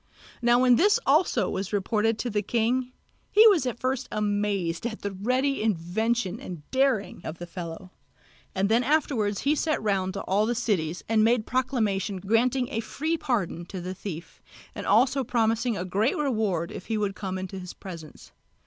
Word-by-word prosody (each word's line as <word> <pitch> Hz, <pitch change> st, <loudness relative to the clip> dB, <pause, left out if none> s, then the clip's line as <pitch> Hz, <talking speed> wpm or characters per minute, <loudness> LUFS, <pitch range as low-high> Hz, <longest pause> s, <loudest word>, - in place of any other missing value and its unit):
Now 240 Hz, 0 st, +4 dB
when 250 Hz, -1 st, +5 dB
this 410 Hz, +3 st, +4 dB
also 305 Hz, +6 st, +3 dB
was 195 Hz, 0 st, -3 dB
reported 215 Hz, +2 st, +1 dB
to 245 Hz, -, -3 dB
the 210 Hz, 0 st, +1 dB
king, 240 Hz, +4 st, 0 dB, 0.4 s
he 435 Hz, +2 st, +6 dB
was 335 Hz, -11 st, +2 dB
at 240 Hz, -1 st, -3 dB
first 260 Hz, 0 st, -1 dB
amazed 205 Hz, -3 st, -1 dB
at 220 Hz, -2 st, -7 dB
the 200 Hz, -, -2 dB
ready 255 Hz, +8 st, 0 dB
invention 215 Hz, +2 st, 0 dB
and 170 Hz, -5 st, -9 dB
daring 260 Hz, -9 st, +1 dB
of 160 Hz, -, -6 dB
the 175 Hz, -, -7 dB
fellow, 175 Hz, +1 st, -8 dB, 0.6 s
and 195 Hz, +1 st, +2 dB
then 230 Hz, +4 st, +3 dB
afterwards 245 Hz, -8 st, +1 dB
he 285 Hz, -, +2 dB
sent 310 Hz, +1 st, 0 dB
round 190 Hz, -2 st, 0 dB
to -, -, -3 dB
all 205 Hz, +3 st, +1 dB
the 240 Hz, -, 0 dB
cities 180 Hz, -8 st, -1 dB
and 220 Hz, -1 st, +3 dB
made 230 Hz, 0 st, +3 dB
proclamation 220 Hz, -7 st, 0 dB
granting 235 Hz, +6 st, +1 dB
a 225 Hz, -, -1 dB
free 315 Hz, +8 st, -2 dB
pardon 230 Hz, -, -2 dB
to 190 Hz, -, -6 dB
the 180 Hz, +1 st, -5 dB
thief, 175 Hz, -3 st, -8 dB, 0.3 s
and -, -, -6 dB
also 260 Hz, +6 st, +4 dB
promising 225 Hz, -1 st, +1 dB
a 180 Hz, -, -3 dB
great 205 Hz, +7 st, +1 dB
reward 215 Hz, -, 0 dB
if 185 Hz, -, -8 dB
he 225 Hz, -, -1 dB
would 205 Hz, -2 st, -1 dB
come 190 Hz, -2 st, -4 dB
into 190 Hz, +1 st, -5 dB
his 180 Hz, -1 st, -8 dB
presence. 165 Hz, -5 st, -10 dB
215 Hz, 180 wpm, -26 LUFS, 190-250 Hz, 0.6 s, he